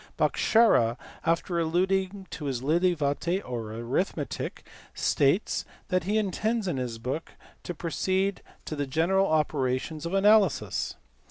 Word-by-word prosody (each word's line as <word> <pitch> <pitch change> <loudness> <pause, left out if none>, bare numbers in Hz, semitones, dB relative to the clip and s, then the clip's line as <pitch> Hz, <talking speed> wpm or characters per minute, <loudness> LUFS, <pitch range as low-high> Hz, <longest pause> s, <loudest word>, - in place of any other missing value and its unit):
Bhaskara 130 - +4 0.3
after 170 +1 +1
alluding 190 +4 0
to 150 - -6
his 130 -3 -2
Lilavati 170 +1 +1
or 115 -3 -4
arithmetic 125 - -3 0.3
states 145 +9 +2 0.3
that 185 -2 +1
he 210 +3 +1
intends 215 +2 0
in 165 -6 -1
this 125 -3 -3
book 130 +8 -4 0.3
to 175 - -6
proceed 185 +5 -1 0.2
to 155 - -4
the 145 -1 -2
general 180 +8 +2
operations 150 0 0
of 180 - -2
analysis. 205 -3 +3
165 Hz, 120 wpm, -27 LUFS, 140-190 Hz, 0.3 s, Bhaskara